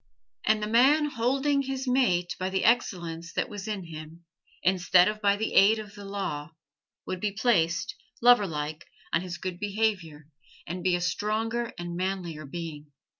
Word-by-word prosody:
And 215 0 +2
the - - -1
man 270 +7 +5
holding 270 +4 +1
his 270 -1 -4
mate 190 -9 +2
by 185 +1 -1
the 190 0 0
excellence 170 -8 0
that - - -1
was 205 -2 -7
in 210 -3 -3
him, 165 0 -10 0.4
instead 180 0 +4
of 215 0 -2
by 200 -1 +4
the 220 +2 -3
aid 210 +3 +6
of 210 -2 -8
the 205 -1 -10
law, 165 -7 -4 0.5
would 185 - -4
be 210 +2 -1
placed, 205 -3 +1 0.3
loverlike, 165 -11 +2 0.3
on 165 - +3
his 180 -2 -6
good 185 -2 -5
behavior, 200 -7 -1 0.4
and 180 +2 -5
be 185 -1 +3
a 175 - -2
stronger 220 +6 -1
and 175 0 -5
manlier 180 -4 -3
being. 155 -2 -7
195 Hz, 165 wpm, -27 LUFS, 170-220 Hz, 0.5 s, aid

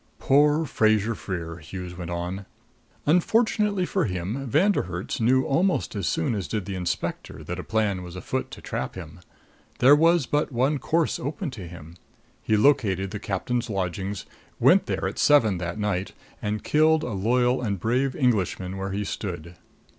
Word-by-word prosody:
"Poor 150 +3 +3
Fraser 110 -3 +2
Freer!" 85 -6 -5
Hughes 90 +2 -8
went 85 -1 -6
on. 90 +3 -4 0.6
"Unfortunately 205 +3 +2
for 190 0 0
him, 100 +8 -3
Von 175 - +4
der - - +1
Herts 90 +2 -5
knew 130 +3 +4
almost 175 - +1
as 100 -4 -2
soon 80 - 0
as 100 -6 -3
did 100 +5 -3
the 100 - -5
inspector 90 -2 -4
that 90 +1 -5
a - - -4
plan 105 -3 0
was 90 -1 -9
afoot 90 - -3
to - - -10
trap 65 - -4
him. 85 -2 -9 0.6
There 135 +4 +7
was 165 0 +4
but 145 +2 0
one 135 +4 +1
course 165 +2 0
open 150 +4 -4
to 100 -8 -8
him: 85 0 -11 0.4
He 110 - +1
located 100 -7 +2
the 105 - -4
captain's 115 +5 -2
lodgings, 95 0 -3 0.3
went - - +5
there - - -1
at - - -5
seven 110 -11 +4
that 85 +1 -4
night, 100 -3 -2 0.3
and 105 0 -2
killed 155 +1 +3
a 125 - -3
loyal 125 +6 +2
and 100 -5 -2
brave 130 +6 0
Englishman 95 - 0
where 95 0 -4
he 105 +1 -1
stood." 90 -4 -5
105 Hz, 170 wpm, -25 LUFS, 90-135 Hz, 0.6 s, There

